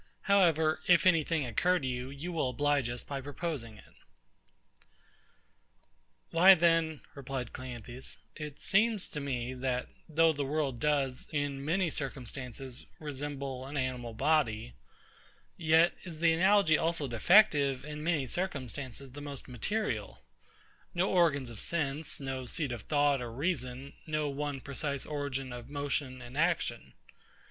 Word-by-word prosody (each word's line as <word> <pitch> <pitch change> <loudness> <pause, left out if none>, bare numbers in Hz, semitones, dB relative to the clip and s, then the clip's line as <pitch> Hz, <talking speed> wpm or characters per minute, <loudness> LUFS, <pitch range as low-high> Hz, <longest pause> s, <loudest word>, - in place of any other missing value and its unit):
However, 165 -6 +3
if 175 0 +6
any 165 -4 +5
thing 160 -2 0
occur 175 +10 +2
to 145 - -4
you, 125 0 -3
you 140 +6 -6
will 155 -6 0
oblige 145 -1 +1
us 120 0 -4
by 140 -1 -5
proposing 140 -6 -5
it. - - -17 2.4
Why 185 +4 +8
then, 165 -2 +2
replied 135 -3 -5
CLEANTHES, 125 0 -8 0.2
it 150 -2 -7
seems 215 0 +2
to 150 - -4
me, 130 -3 -3
that, 125 -1 -2 0.2
though 160 +1 +4
the 145 -1 -2
world 140 -3 -1
does, 140 -2 0
in 145 -2 -2
many 170 +3 +1
circumstances, 130 -2 -6
resemble 140 -3 -5
an 145 +1 -5
animal 125 -3 -3
body; 120 - +1 0.8
yet 165 +1 +4
is 170 -4 -8
the 165 0 +4
analogy 185 -2 +4
also 165 -3 +1
defective 140 - +4
in 150 0 -6
many 155 -4 +1
circumstances 140 -5 -4
the 145 +3 -9
most 140 -2 -7
material: 205 - -2 0.7
no 180 +3 +2
organs 145 -9 +3
of 110 - -9
sense; 150 0 -1
no 135 -2 -4
seat 145 +1 -1
of 120 -3 -4
thought 145 -2 +2
or 120 -1 -5
reason; 135 -1 -3
no 155 -1 0
one 140 -1 -3
precise 140 +1 -3
origin 140 -3 -3
of 120 +1 -8
motion 140 -3 -3
and 125 +4 -7
action. 170 +1 0
145 Hz, 140 wpm, -31 LUFS, 130-160 Hz, 2.4 s, Why